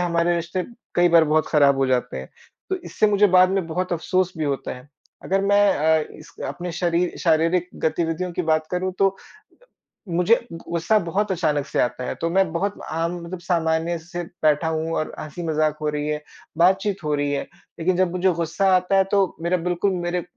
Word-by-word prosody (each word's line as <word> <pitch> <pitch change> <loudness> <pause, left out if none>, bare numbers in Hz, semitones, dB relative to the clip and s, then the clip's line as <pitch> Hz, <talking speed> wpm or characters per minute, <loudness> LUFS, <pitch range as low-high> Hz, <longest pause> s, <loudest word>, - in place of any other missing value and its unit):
हमारे 170 0 +1
रिश्ते 170 +2 -2 0.3
कई 175 0 +4
बार 165 -1 +6
बहुत 155 +1 +1
ख़राब 140 -2 +4
हो 135 - +2
जाते 125 - 0
हैं। 65 - -9 0.4
तो 380 - +1
इससे 215 - +1
मुझे 205 0 +4
बाद 185 0 +6
में 190 -3 0
बहुत 180 +3 -2
अफ़सोस 185 +2 0
भी 155 - -1
होता 140 -3 -2
है। 125 +3 -15 0.4
अगर 195 +1 +1
मैं 200 +1 +4
अ, 160 +1 +3
इस 160 +2 -14
अपने 175 0 -5
शरीर 175 +1 0
शारीरिक 165 +2 +2 0.2
गतिविधियों 165 +2 -1
की 180 - -2
बात 155 -1 +1
करूँ 185 +1 -1
तो, 195 0 +2 0.9
मुझे 180 +7 +3
गुस्सा 170 +4 0
बहुत 190 +4 -1
अचानक 150 -5 0
से - - -2
आता 125 +1 -1
है, - - -3
तो 165 - -2
मैं 190 -1 +2
बहुत 195 +4 -1 0.2
आम 165 +2 -1
मतलब 175 +2 -6
सामान्य 165 -1 0
से 175 +2 -6 0.2
बैठा 155 +1 +3
हूँ 160 0 -2
और 155 - -3
हँसी 155 +3 -7
मज़ाक 155 -1 +1
हो 150 - 0
रही 150 0 -3
है, 150 0 -2 0.3
बातचीत 190 +2 +2
हो 150 -1 -1
रही 145 0 -1
है, 140 - -1 0.4
लेकिन 180 +3 +1
जब 185 -2 +2
मुझे 185 +1 +2
गुस्सा 170 +4 -1
आता 185 +2 +2
है 195 - +5
तो 195 -3 +2
मेरा 170 +2 +1
बिल्कुल 180 +3 0
मेरे, 175 0 -2
170 Hz, 195 wpm, -23 LUFS, 155-185 Hz, 0.9 s, बार